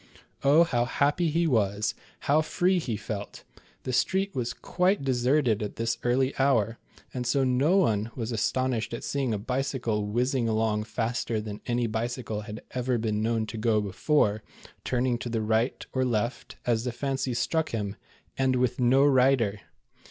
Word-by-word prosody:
Oh, 145 Hz, +5 st, +6 dB
how 120 Hz, -8 st, +1 dB
happy 145 Hz, +6 st, +1 dB
he 170 Hz, +3 st, +1 dB
was, 105 Hz, -6 st, +1 dB, 0.3 s
how 150 Hz, +2 st, +3 dB
free 180 Hz, +3 st, +1 dB
he 120 Hz, -9 st, -3 dB
felt. 100 Hz, 0 st, -6 dB, 0.4 s
The 130 Hz, -, -3 dB
street 190 Hz, +9 st, +1 dB
was 120 Hz, -2 st, -2 dB
quite 180 Hz, -2 st, 0 dB
deserted 125 Hz, -3 st, +2 dB
at 105 Hz, -, -4 dB
this 115 Hz, +1 st, -1 dB
early 130 Hz, +2 st, +1 dB
hour, 115 Hz, -5 st, +2 dB, 0.3 s
and 125 Hz, -1 st, -3 dB
so 135 Hz, +2 st, +2 dB
no 135 Hz, +8 st, +3 dB
one 110 Hz, -, +2 dB
was 115 Hz, -1 st, -3 dB
astonished 120 Hz, 0 st, -1 dB
at -, -, -8 dB
seeing 135 Hz, -4 st, -1 dB
a 105 Hz, -, 0 dB
bicycle 120 Hz, -2 st, -2 dB
whizzing 120 Hz, +2 st, 0 dB
along 110 Hz, -1 st, 0 dB
faster 115 Hz, 0 st, -2 dB
than 105 Hz, -1 st, -6 dB
any 120 Hz, 0 st, +1 dB
bicycle 115 Hz, -1 st, -3 dB
had 105 Hz, +1 st, -8 dB
ever 125 Hz, -1 st, 0 dB
been 110 Hz, -2 st, -1 dB
known 115 Hz, 0 st, 0 dB
to 110 Hz, -, -7 dB
go 110 Hz, -1 st, +2 dB
before, 105 Hz, +2 st, +1 dB, 0.4 s
turning 125 Hz, -1 st, 0 dB
to 120 Hz, -, -5 dB
the 115 Hz, -1 st, -1 dB
right 110 Hz, +3 st, 0 dB
or 130 Hz, -, +1 dB
left, 120 Hz, 0 st, -2 dB
as 115 Hz, -2 st, +1 dB
the 125 Hz, -, -2 dB
fancy 135 Hz, 0 st, -2 dB
struck 160 Hz, +6 st, 0 dB
him, 105 Hz, -3 st, -3 dB, 0.4 s
and 130 Hz, -1 st, +2 dB
with 125 Hz, 0 st, 0 dB
no 130 Hz, +3 st, +5 dB
rider 130 Hz, -6 st, +3 dB
120 Hz, 165 wpm, -27 LUFS, 110-135 Hz, 0.4 s, Oh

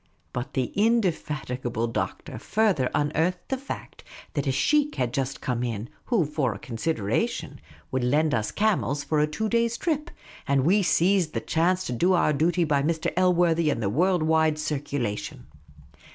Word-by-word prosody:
But 125 Hz, +1 st, -4 dB
the 130 Hz, -2 st, -1 dB
indefatigable 150 Hz, -, 0 dB
Doctor 115 Hz, -, -4 dB
further 195 Hz, -12 st, +1 dB
unearthed 160 Hz, +5 st, 0 dB
the 265 Hz, -, 0 dB
fact 275 Hz, -, -8 dB, 0.3 s
that 145 Hz, -2 st, -2 dB
a -, -, +3 dB
sheikh 290 Hz, -, +2 dB
had 125 Hz, -2 st, -1 dB
just 135 Hz, 0 st, -2 dB
come 120 Hz, -2 st, -2 dB
in, 115 Hz, -1 st, -3 dB, 0.2 s
who 225 Hz, -10 st, +2 dB
(for 140 Hz, -7 st, -1 dB
a -, -, -6 dB
consideration) 125 Hz, -, -2 dB, 0.3 s
would 130 Hz, -1 st, 0 dB
lend 150 Hz, +4 st, +2 dB
us 110 Hz, -2 st, 0 dB
camels 190 Hz, -9 st, 0 dB
for 155 Hz, -, 0 dB
a 150 Hz, -, +3 dB
two 220 Hz, +9 st, -2 dB
days' 235 Hz, +1 st, +1 dB
trip; 305 Hz, -3 st, -1 dB, 0.4 s
and 140 Hz, -1 st, +2 dB
we 200 Hz, +5 st, +4 dB
seized 180 Hz, -2 st, +2 dB
the -, -, +1 dB
chance 180 Hz, +3 st, +1 dB
to -, -, -3 dB
do 175 Hz, +10 st, +2 dB
our 170 Hz, -4 st, +3 dB
duty 170 Hz, +4 st, +2 dB
by 145 Hz, -3 st, +2 dB
Mr. 160 Hz, +2 st, -1 dB
Elworthy 175 Hz, -3 st, +3 dB
and 140 Hz, -, 0 dB
the 100 Hz, -, +1 dB
world 175 Hz, -, +2 dB
wide 160 Hz, -1 st, +3 dB
circula 145 Hz, -7 st, -2 dB
tion. -, -, -9 dB
155 Hz, 170 wpm, -26 LUFS, 130-185 Hz, 0.4 s, we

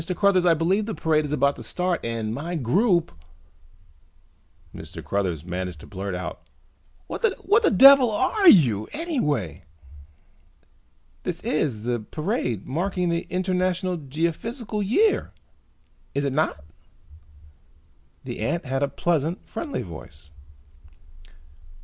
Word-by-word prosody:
Cruthers, 190 Hz, -3 st, +3 dB
I 165 Hz, -, +5 dB
believe 190 Hz, +7 st, +1 dB
the 220 Hz, -, -3 dB
parade 155 Hz, -1 st, +1 dB
is 145 Hz, -, -5 dB
about 140 Hz, -1 st, +2 dB
to -, -, -9 dB
start 180 Hz, -1 st, -1 dB
and 115 Hz, -2 st, -3 dB
my 165 Hz, +7 st, -4 dB
group 170 Hz, -, +2 dB, 0.8 s
" 70 Hz, -, -28 dB
Mr. -, -, -9 dB
Cruthers 90 Hz, -6 st, -2 dB
managed 90 Hz, -2 st, -4 dB
to -, -, -11 dB
blurt 95 Hz, -1 st, -5 dB
out. 90 Hz, -, -6 dB, 0.6 s
"What -, -, -6 dB
the 435 Hz, -1 st, +2 dB
devil 275 Hz, -2 st, +8 dB
are 265 Hz, -, +4 dB
you 115 Hz, -, +5 dB
anyway!" 145 Hz, -, -2 dB, 1.6 s
"This -, -, -4 dB
is 130 Hz, -8 st, -1 dB
the 120 Hz, 0 st, -1 dB
parade 125 Hz, -, -3 dB
marking 180 Hz, +4 st, -1 dB
the 170 Hz, 0 st, -2 dB
International 185 Hz, 0 st, 0 dB
Geophysical 170 Hz, -, -3 dB
Year, 405 Hz, -, +2 dB, 0.8 s
is 140 Hz, 0 st, 0 dB
it 140 Hz, -, -1 dB
not?" 135 Hz, -, 0 dB, 1.6 s
The -, -, -6 dB
ant 170 Hz, +1 st, -2 dB
had 135 Hz, +1 st, -2 dB
a 140 Hz, -, +2 dB
pleasant, 165 Hz, +3 st, -1 dB
friendly 300 Hz, -4 st, -4 dB
voice. 80 Hz, -3 st, -11 dB
160 Hz, 120 wpm, -24 LUFS, -, 1.6 s, devil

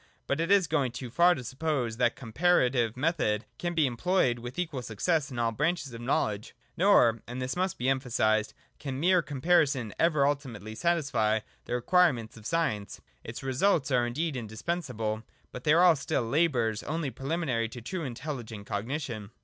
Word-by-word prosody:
But 140 Hz, -, -1 dB
it 165 Hz, -, -1 dB
is 200 Hz, -2 st, +5 dB
going 140 Hz, -6 st, 0 dB
too 125 Hz, -1 st, -6 dB
far 175 Hz, +6 st, +5 dB
to 130 Hz, -, -6 dB
suppose 130 Hz, -3 st, -2 dB
that 120 Hz, -1 st, +2 dB
the -, -, -18 dB
compara 130 Hz, +2 st, +3 dB
tive 120 Hz, -2 st, 0 dB
method 130 Hz, -8 st, 0 dB
can 175 Hz, 0 st, -2 dB
be 160 Hz, -2 st, +4 dB
employed 130 Hz, -1 st, +1 dB
with 120 Hz, +2 st, -8 dB
equal 160 Hz, -7 st, -2 dB
success 140 Hz, -, -1 dB
in 125 Hz, -, -7 dB
all 115 Hz, -1 st, +1 dB
branches 150 Hz, +1 st, -1 dB
of 115 Hz, -, -8 dB
knowledge. 110 Hz, -3 st, -1 dB, 0.2 s
Nor 120 Hz, -, +4 dB
— -, -, -43 dB
and 125 Hz, +2 st, -6 dB
this 130 Hz, 0 st, -3 dB
must 185 Hz, +1 st, -1 dB
be 125 Hz, -, -2 dB
emphasised 115 Hz, -5 st, +1 dB
— -, -, -40 dB
can 135 Hz, -2 st, -4 dB
mere 180 Hz, +3 st, +4 dB
comparison 140 Hz, -, +1 dB
ever 155 Hz, -4 st, +3 dB
ultimately 125 Hz, -7 st, -3 dB
satisfy 125 Hz, -8 st, +1 dB, 0.2 s
the -, -, -2 dB
require 180 Hz, +7 st, +4 dB
ments 115 Hz, -3 st, -8 dB
of 110 Hz, -1 st, -9 dB
science. 150 Hz, -12 st, -1 dB, 0.2 s
Its 115 Hz, +4 st, -7 dB
results 140 Hz, +2 st, +1 dB
are 120 Hz, -1 st, +3 dB
indeed 150 Hz, +5 st, -2 dB
indispensable, 115 Hz, -2 st, -3 dB, 0.3 s
but 125 Hz, -, -9 dB
they 150 Hz, -, +5 dB
are 175 Hz, 0 st, +6 dB
still 140 Hz, -3 st, -1 dB
labours 120 Hz, -5 st, +1 dB
only 155 Hz, -2 st, -3 dB
preliminary 135 Hz, -6 st, -2 dB
to 120 Hz, -, -8 dB
truly 160 Hz, +6 st, -4 dB
intelligent 120 Hz, -5 st, -6 dB
cognition. 110 Hz, 0 st, -4 dB
130 Hz, 180 wpm, -29 LUFS, 115-160 Hz, 0.3 s, are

